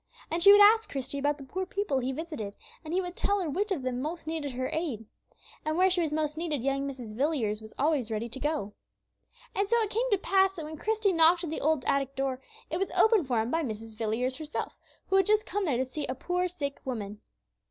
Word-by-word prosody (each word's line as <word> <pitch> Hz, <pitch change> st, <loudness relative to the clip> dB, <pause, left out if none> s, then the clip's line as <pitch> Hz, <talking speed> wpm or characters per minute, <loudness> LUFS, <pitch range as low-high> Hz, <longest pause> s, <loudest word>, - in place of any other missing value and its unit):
And 335 Hz, +1 st, 0 dB
she 400 Hz, +3 st, +9 dB
would 410 Hz, 0 st, +8 dB
ask 440 Hz, +2 st, +6 dB
Christie 275 Hz, +1 st, -4 dB
about 290 Hz, +1 st, +1 dB
the 280 Hz, -, -10 dB
poor 375 Hz, +8 st, -3 dB
people 375 Hz, -7 st, -1 dB
he 260 Hz, +1 st, -1 dB
visited, 265 Hz, -9 st, -5 dB, 0.3 s
and 310 Hz, -, -7 dB
he 365 Hz, +2 st, +2 dB
would 355 Hz, -1 st, -6 dB
tell 405 Hz, 0 st, +1 dB
her 360 Hz, -, -1 dB
which 400 Hz, +8 st, -1 dB
of 320 Hz, -9 st, -1 dB
them 255 Hz, -1 st, -2 dB
most 320 Hz, +4 st, -4 dB
needed 310 Hz, -4 st, -3 dB
her 255 Hz, +1 st, -2 dB
aid. 290 Hz, -10 st, -2 dB, 0.6 s
And 310 Hz, +1 st, -1 dB
where 375 Hz, +1 st, +4 dB
she 355 Hz, -1 st, +2 dB
was 320 Hz, -3 st, 0 dB
most 305 Hz, 0 st, -1 dB
needed 305 Hz, -7 st, -2 dB
young 275 Hz, +1 st, 0 dB
Mrs. 245 Hz, -6 st, -8 dB
Villiers 240 Hz, -6 st, 0 dB
was 220 Hz, 0 st, -11 dB
always 285 Hz, -5 st, +1 dB
ready 220 Hz, +1 st, -2 dB
to 245 Hz, +3 st, -7 dB
go. 295 Hz, -9 st, -2 dB, 0.8 s
And 400 Hz, 0 st, 0 dB
so 470 Hz, -, +4 dB
it 430 Hz, -2 st, -1 dB
came 485 Hz, +3 st, 0 dB
to 405 Hz, -, +3 dB
pass 385 Hz, 0 st, +2 dB
that 320 Hz, -4 st, -6 dB
when 310 Hz, +1 st, -7 dB
Christie 430 Hz, +1 st, +1 dB
knocked 335 Hz, +1 st, +5 dB
at 325 Hz, -, -3 dB
the -, -, -3 dB
old 310 Hz, -3 st, +1 dB
attic 275 Hz, -1 st, 0 dB
door, 265 Hz, -1 st, -2 dB, 0.3 s
it 330 Hz, -, 0 dB
was 390 Hz, +1 st, -1 dB
opened 435 Hz, -, +5 dB
for 240 Hz, -4 st, +2 dB
him 225 Hz, +3 st, -3 dB
by 330 Hz, -, +1 dB
Mrs. 225 Hz, -4 st, -5 dB
Villiers 230 Hz, +4 st, -1 dB
herself, 310 Hz, -1 st, -4 dB, 0.3 s
who 385 Hz, -, +2 dB
had 385 Hz, -, +3 dB
just 425 Hz, 0 st, +3 dB
come 410 Hz, -1 st, -2 dB
there 280 Hz, -8 st, +1 dB
to 260 Hz, -, 0 dB
see 285 Hz, +3 st, -4 dB
a 255 Hz, -, -2 dB
poor 360 Hz, +6 st, -1 dB
sick 290 Hz, -6 st, -5 dB
woman. 210 Hz, -5 st, -5 dB
305 Hz, 245 wpm, -29 LUFS, 255-360 Hz, 0.8 s, she